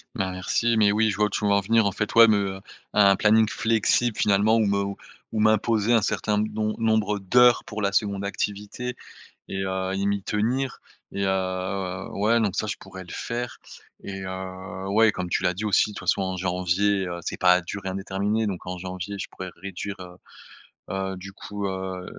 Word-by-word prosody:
Ben, 95 -1 -1
merci, 115 +5 0
mais 105 -2 +4
oui, 110 +1 +2
je 100 - -1
vois 105 - +2
où - - -7
tu 105 - -2
veux 100 - +3
en 100 - +4
venir, 110 +2 +3
en 100 - +1
fait, 105 - -2
ouais, 115 0 +9
me, 100 -3 +1
heu, - - -13 0.3
un 100 -2 +6
planning 110 +2 +4
flexible 115 +1 +1
finalement 105 +2 +3
ou 110 - +3
me 100 0 0 0.4
ou 110 - -1
m'imposer 110 +1 +3
un 115 - +5
certain 105 +1 0
d 105 +1 0
nom 110 0 -1
nombre 110 -2 +1
d'heures 120 +5 +5
pour 105 0 -6
la 100 0 0
2nde 100 -1 0
activité 105 +5 -4 0.5
et 95 0 -2
heu 95 0 -2
et 100 0 -1
m'y 100 -1 0
tenir 125 +5 -1 0.3
et 100 0 -2
heu, 95 0 -2
ouais, 110 +4 +2
donc 105 -4 0
ça 110 - -1
je 100 - -3
pourrais 95 -1 -10
le 90 - -12
faire 120 0 -4 0.4
et 95 -1 -6
heu, 95 0 -6
ouais, 110 +2 +4
comme 90 -2 -4
tu 90 - -1
l'as 90 - +2
dit 105 +4 -4
aussi 105 +1 +3
de - - -12
toute - - -8
façon, 100 - +3
en 95 -1 -2
janvier, 95 +2 +1
heu, 85 -1 -5
c'est - - -4
pas 90 0 +5
à 90 - +1
durée 95 +2 -5
indéterminée 100 +3 -1
donc 95 -3 -5
en 90 0 -5
janvier 95 +2 -6
je - - -4
pourrais 95 - -7
réduire, 100 +1 -6
heu, 90 -1 -10 0.8
heu, 95 0 -3
du 95 +1 -9
coup, 100 0 -5
heu, 95 -1 -4
100 Hz, 210 wpm, -25 LUFS, 95-110 Hz, 0.8 s, ouais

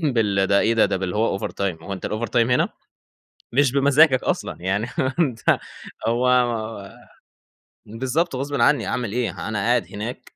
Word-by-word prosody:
بال 100 -4 +2
ده 100 +1 +3
إيه 115 +1 +2
ده؟ 115 - +4
ده - - -1
باللي 95 0 -3
هو 105 -3 +1
over - - -4
time 90 -5 -3
هو 100 - -6
أنتَ 95 - -5
الover 110 +2 -3
time - - -6
هنا 125 - +3 0.8
مش 140 0 +3
بمزاجك 140 0 +4
أصلًا، - - -2
يعني 100 +4 0 0.3
أنتَ 130 -9 +1 0.7
هو 120 +2 +1 1.6
بالضبط 130 +8 -2
غصبٍ 140 +2 -3
عني 120 -4 +3
أعمل 120 -5 -2
إيه؟ 125 -1 -3
أنا 105 -2 -2
قاعد 120 +4 +1
هناك 110 +4 -7
115 Hz, 160 wpm, -22 LUFS, 100-130 Hz, 1.6 s, ده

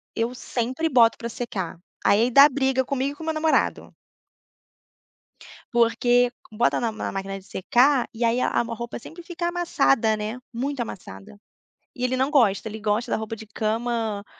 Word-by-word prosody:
eu 230 +2 -1
sempre 255 +5 -2
boto 235 -4 +5
pra 235 - -5
secar, 200 -7 -5 0.3
aí 225 +4 +4
dá 275 +4 +8
briga 265 -1 +1
comigo 275 +1 -2
e - - -16
com 320 - -10
meu 320 0 -1
namorado. 310 0 0 1.8
Porque 240 +1 +3 0.2
bota 225 +3 +1
na 230 -2 0
na 215 - -5
máquina 195 0 -4
de 190 - -20
secar, 245 +8 +2
e 235 +1 -1
aí 235 +2 +2
a - - +2
a - - +1
roupa 235 +1 -6
sempre 330 +8 -11
fica 345 0 -4
amassada. 280 -10 +2
né, 215 +3 -4
muito 265 +3 -3
amassada. 180 - -9 0.6
E 250 - -3
ele 255 +1 0
não 265 +2 +1
gosta, 225 -7 +2
gosta 220 +3 -1
da - - +1
roupa 220 0 -5
de 225 0 -10
cama, 220 0 -2
240 Hz, 165 wpm, -24 LUFS, 220-265 Hz, 1.8 s, dá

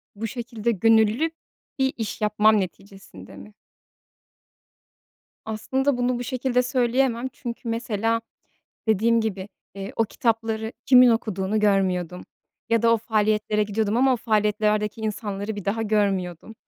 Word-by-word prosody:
Bu 225 +3 -4
şekilde 235 -1 -3
gönüllü 225 - +3 0.5
bir 265 0 +1
iş 225 -1 -5
yapmam 210 0 +4
neticesinde 190 - -8
mi? 210 - -13 1.9
Aslında 260 +5 -1
bunu 245 0 0
bu - - -3
şekilde 250 0 0
söyleyemem 250 0 +1
çünkü, 235 0 -6
mesela, 230 0 -1 0.7
dediğim 230 +2 +3
gibi, 200 -3 -3 0.3
eee, 195 +1 -7
o 225 - +3
kitapları 225 0 -1
kimin 255 -1 +7
okuduğunu 215 -3 0
görmüyordum 185 -4 +1 0.5
ya 230 -1 +2
da 230 0 +5
o - - +4
faaliyetlere 215 -1 0
gidiyordum 210 +1 -1
ama 260 +1 +4
o - - +1
faaliyetlerdeki 210 -1 0
insanları 210 -1 -4
bir 205 - -6
daha 210 +4 -1
görmüyordum 200 -3 -1
220 Hz, 125 wpm, -24 LUFS, 205-235 Hz, 1.9 s, kimin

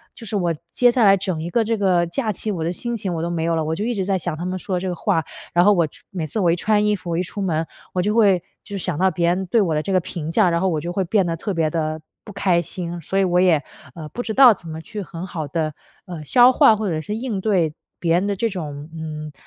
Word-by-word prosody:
就 230 - -11
是 215 - -4
我 175 -4 +1 0.2
接 245 -1 +4
下 240 -2 +3
来 195 -1 +7
整 185 -4 -3
一 170 - -4
个 230 +5 +2
这 225 +1 -1
个 185 -4 +2
假 225 +6 -2
期， 210 +2 -3
我 175 -5 -3
的 165 - -1
心 240 +5 -3
情 190 -3 -3
我 160 - -2
都 170 - -2
没 170 -2 -2
有 165 0 +1
了， 160 - 0
我 155 +1 -2
就 205 +6 -3
一 245 - 0
直 190 -2 -1
在 195 0 +1
想 175 -3 -3
他 170 - -5
们 185 +1 -3
说 185 +1 -3
的 - - 0
这 190 - -2
个 180 - -3
话。 165 -1 0 0.3
然 175 - +5
后 205 - +6
我 170 -4 +2
穿 - - -18
每 175 -4 -3
次 220 - -3
我 175 -3 +4
一 - - +2
穿 210 +2 +2
衣 210 - +3
服， 180 -3 -8
我 165 - 0
一 180 - +1
出 200 - -6
门， 165 -4 0 0.3
我 180 - +1
就 205 +3 0
会 200 -6 +4 0.2
就 205 -1 -5
是 190 - -4
想 175 -5 -2
到 190 - +4
别 170 +1 0
人 185 +2 0
对 215 +5 +2
我 170 -5 +1
的 150 - +1
这 195 +5 -3
个 185 - +5
评 165 -3 -5
价， 185 0 +4
然 170 - +1
后 190 - +2
我 155 -4 -1
就 175 - -4
会 190 +2 0
变 195 +2 +2
得 165 -1 -2
特 200 +4 -3
别 165 -3 +1
地 155 0 -2 0.2
不 210 - -10
开 175 -3 +2
心。 175 0 -6
所 190 +5 -3
以 195 - +4
我 180 -1 +2
也， 170 -5 +4 0.3
呃， 155 -2 -7
不 245 - -5
知 220 - -3
道 255 -1 +8
怎 175 - -13
么 160 0 -6
去 205 +6 -7
很 170 -1 -7
好 160 -5 -5
地， 155 0 -2 0.3
呃， 170 -4 -7
消 245 - +6
化 225 -3 +6
或 210 -1 -2
者 160 -2 -1
是 210 +6 -4
应 225 -3 -3
对 185 -7 +1 0.3
别 165 -1 +1
人 185 +3 +1
的 200 - 0
这 230 +4 0
种， 150 -5 -6
嗯， 155 -1 -6
180 Hz, 330 characters per minute, -21 LUFS, 165-205 Hz, 0.3 s, 道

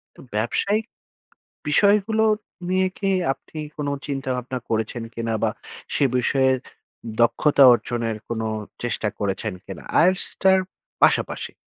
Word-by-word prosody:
তো - - -18 0.2
ব্যবসায়িক, 200 - 0 0.8
বিষয়গুলো 210 +6 +3 0.4
নিয়ে 185 0 +2
কি 195 - -1 0.2
আপনি 155 - -11 0.2
কোনো 145 -1 -2 0.2
চিন্তাভাবনা 130 -2 -3
করেছেন? 110 +1 -2
কিনা 115 -1 -2
বা - - +3 0.5
সে 145 - +3
বিষয়ে 130 +1 +3 0.7
দক্ষতা 135 +5 +4
অর্জনের 115 -2 -2
কোনো 115 -1 -2 0.4
চেষ্টা 120 -2 -1
করেছেন 100 +1 -2
কিনা? - - -8 0.2
IELTS 185 +2 +3 0.2
টার 190 0 +6 0.4
পাশাপাশি। - - +2
130 Hz, 115 wpm, -23 LUFS, 115-185 Hz, 0.8 s, টার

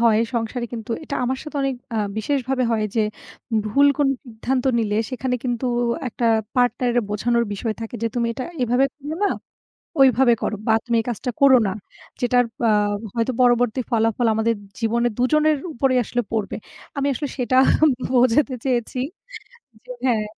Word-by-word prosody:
হয় 230 -2 +4 0.2
সংসারে 235 +1 -2
কিন্তু 230 -1 -6
এটা 280 - -4
আমার 260 +1 -1
সাথে 300 -1 -7
অনেক 270 -1 0 0.2
আ - - 0 0.2
বিশেষভাবে 260 +2 0
হয় 220 -2 +1
যে 220 - +4 0.6
ভুল 280 +7 +4
কোন 285 -2 +3 0.2
সিদ্ধান্ত 245 +2 -2
নিলে 210 -2 0
সেখানে 255 0 -2
কিন্তু 245 +1 -1 0.4
একটা 235 +1 -2 0.3
পার্টনারের 245 -1 +2
বোঝানোর 235 +3 +1
বিষয় 215 +2 -3
থাকে 225 +1 -6
যে, - - +2
তুমি 235 -1 0
এটা 255 +2 -5 0.2
এভাবে 245 +3 +3
করো 295 +1 -6
না, - - +3 0.7
ঐভাবে 260 -2 +5
করো। 215 - -1
বা 220 - +5
তুমি 235 -1 0
এই - - -13
কাজটা 240 +2 -3
করো 270 -2 +8
না। - - -1 0.5
যেটার 245 0 +3 0.2
আ - - +4 0.5
হয়তো 230 +2 +1
পরবর্তী 245 0 +3
ফলাফল 225 +1 +1
আমাদের 225 +1 +1 0.2
জীবনে 235 +1 +1
২ 245 - +1
জনের 305 0 +4 0.2
উপরেই 255 +1 +2
আসলে 245 +2 -1
পড়বে। 215 -3 -2 0.4
আমি 280 0 +1
আসলে 290 +3 -3
সেটা 255 0 +1 0.5
বোঝাতে 255 +2 +3
চেয়েছি 250 -1 -1 0.9
যে 250 - -6
হ্যাঁ। 225 -4 +2
245 Hz, 160 wpm, -22 LUFS, 230-260 Hz, 0.9 s, করো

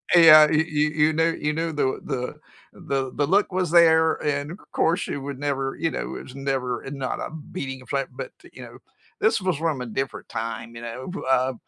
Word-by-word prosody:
Uh, - - +8
yeah, 155 -2 +9
you 160 0 +3
you 150 -1 0
you 155 +1 +2
knew 165 +1 +2
you 150 -1 -1
knew 165 +2 -2
the 135 -3 0
the 125 -3 -3 0.5
the 135 -2 -2
the 145 - +1
look 195 +5 +3
was 180 -3 -1
there, 160 -2 +6
and, 145 0 -1
of 185 - -9
course, 170 +3 +2
she - - -3
would 140 -1 -6
never, 135 -2 -2
you 165 +1 +1
know, 65 - -4
it - - -6
was 130 - -12
never 135 -3 -2
uh, 135 - -6
not 135 -2 -3
a - - -5 0.2
beating 135 -6 -5
of 130 - -17
flat, 140 -1 -1
but - - -6
t - - -17
you - - -11
know, - - -11 0.4
this 420 - +2
was 185 -4 0
from 155 -4 -1
a - - -3
different 135 +4 -4
time, 115 +1 -5
you 115 - -8
know, 120 +5 -6 0.2
uh 130 0 +2
145 Hz, 230 wpm, -24 LUFS, 130-160 Hz, 0.5 s, yeah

